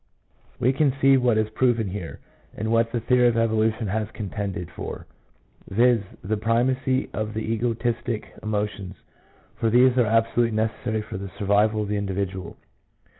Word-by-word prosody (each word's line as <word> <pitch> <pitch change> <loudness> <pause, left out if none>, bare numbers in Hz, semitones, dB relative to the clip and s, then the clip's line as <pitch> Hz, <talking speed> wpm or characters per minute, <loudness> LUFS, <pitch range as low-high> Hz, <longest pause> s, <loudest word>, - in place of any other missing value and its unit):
We 130 +3 +3
can 140 -1 +2
see 135 0 +6
what 125 -4 +3
is 110 0 0
proven 115 -1 +1
here, 90 -3 -6 0.4
and 110 +1 -2
what 115 0 +2
the 120 - -2
theory 125 +1 +4
of 115 -1 +2
evolution 110 0 +1
has 105 +1 -2
contended 100 -4 -5
for— - - -7 0.6
viz., 120 +2 +4 0.2
the 105 +3 -1
primacy 130 +4 +1
of 110 0 -3
the 110 - -1
egotistic 120 0 -2
emotions, 105 -3 -3 0.6
for 115 -2 +1
these 125 +2 +5
are 120 - +4
abso 115 +1 +1
lutely 115 -2 +2
necessary 110 0 -1
for 105 - -7
the 100 0 -6
survival 105 +1 +2
of - - -5
the 105 0 -1
individual. 95 -2 -3
110 Hz, 160 wpm, -24 LUFS, 105-120 Hz, 0.6 s, see